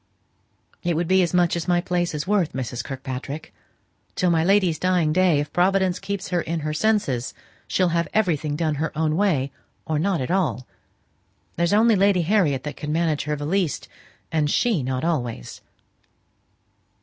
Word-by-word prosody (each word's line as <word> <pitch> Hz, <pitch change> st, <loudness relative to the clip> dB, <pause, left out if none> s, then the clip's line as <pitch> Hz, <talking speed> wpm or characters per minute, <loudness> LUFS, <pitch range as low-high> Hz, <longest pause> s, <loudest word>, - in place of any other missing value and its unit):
"It 175 Hz, -2 st, 0 dB
would 165 Hz, +1 st, -1 dB
be 190 Hz, +1 st, +4 dB
as 175 Hz, -, +1 dB
much 175 Hz, -2 st, +2 dB
as 170 Hz, 0 st, -3 dB
my 175 Hz, -1 st, +3 dB
place 175 Hz, -1 st, -1 dB
is 150 Hz, +1 st, -3 dB
worth, 190 Hz, -4 st, +1 dB
Mrs. 125 Hz, -2 st, -4 dB
Kirkpatrick. 135 Hz, +2 st, -6 dB, 0.6 s
Till 180 Hz, -1 st, +2 dB
my 160 Hz, -1 st, +2 dB
lady's 185 Hz, -3 st, +3 dB
dying 180 Hz, -4 st, +2 dB
day, 180 Hz, -4 st, +3 dB
if 145 Hz, -, -4 dB
Providence 185 Hz, 0 st, +2 dB
keeps 195 Hz, -1 st, -4 dB
her 175 Hz, -2 st, +1 dB
in 165 Hz, 0 st, -3 dB
her 155 Hz, 0 st, -2 dB
senses, 175 Hz, -, 0 dB, 0.3 s
she'll 185 Hz, -2 st, +2 dB
have 170 Hz, -1 st, 0 dB
everything 160 Hz, -8 st, 0 dB
done 155 Hz, -1 st, 0 dB
her 160 Hz, -, -1 dB
own 155 Hz, -1 st, +1 dB
way, 160 Hz, -9 st, +1 dB, 0.3 s
or 155 Hz, -1 st, -1 dB
not 190 Hz, +2 st, +1 dB
at 130 Hz, +4 st, -3 dB
all. 180 Hz, -9 st, 0 dB, 0.9 s
There's 170 Hz, 0 st, +1 dB
only 220 Hz, +2 st, +5 dB
Lady 195 Hz, -2 st, +3 dB
Harriet 160 Hz, -8 st, +2 dB
that 150 Hz, -, -6 dB
can 150 Hz, -, -4 dB
manage 160 Hz, -2 st, 0 dB
her 150 Hz, 0 st, -1 dB
the 145 Hz, 0 st, -5 dB
least, 180 Hz, -1 st, -1 dB, 0.4 s
and 155 Hz, -2 st, +1 dB
she 220 Hz, -, +2 dB
not 130 Hz, +1 st, -2 dB
always." 125 Hz, -, -3 dB
170 Hz, 175 wpm, -23 LUFS, 150-185 Hz, 0.9 s, only